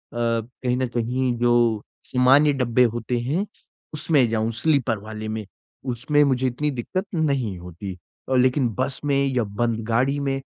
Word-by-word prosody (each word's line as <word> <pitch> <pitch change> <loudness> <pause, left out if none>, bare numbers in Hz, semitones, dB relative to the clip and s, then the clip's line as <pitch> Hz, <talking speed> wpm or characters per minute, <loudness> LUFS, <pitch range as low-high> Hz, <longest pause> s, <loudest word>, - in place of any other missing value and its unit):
कहीं 120 +1 -1
न 130 0 0
कहीं 125 +2 0
जो 120 -3 +3 0.2
सामान्य 135 +4 +4
डब्बे 125 -2 +2
होते 120 +1 -2
हैं 155 +12 -1 0.5
उसमें 150 -4 +2
जाऊँ 110 0 0
स्लीपर 140 -8 +2
वाले 110 0 -6
में 110 - -5 0.5
उसमें 145 +5 +2
मुझे 130 -2 +1
इतनी 145 +4 -1
दिक्कत 145 - -3
नहीं 160 - +1
है - - +2
नहीं 125 -9 -1
होती। 90 +2 -8 0.3
अ, 130 - +2
लेकिन 130 0 +3
बस 130 +1 -1
में 140 -1 +2
या 130 -3 +1
बंद 110 +2 -1
गाड़ी 130 +5 +1
में 135 -1 -1
125 Hz, 165 wpm, -23 LUFS, 115-140 Hz, 0.5 s, सामान्य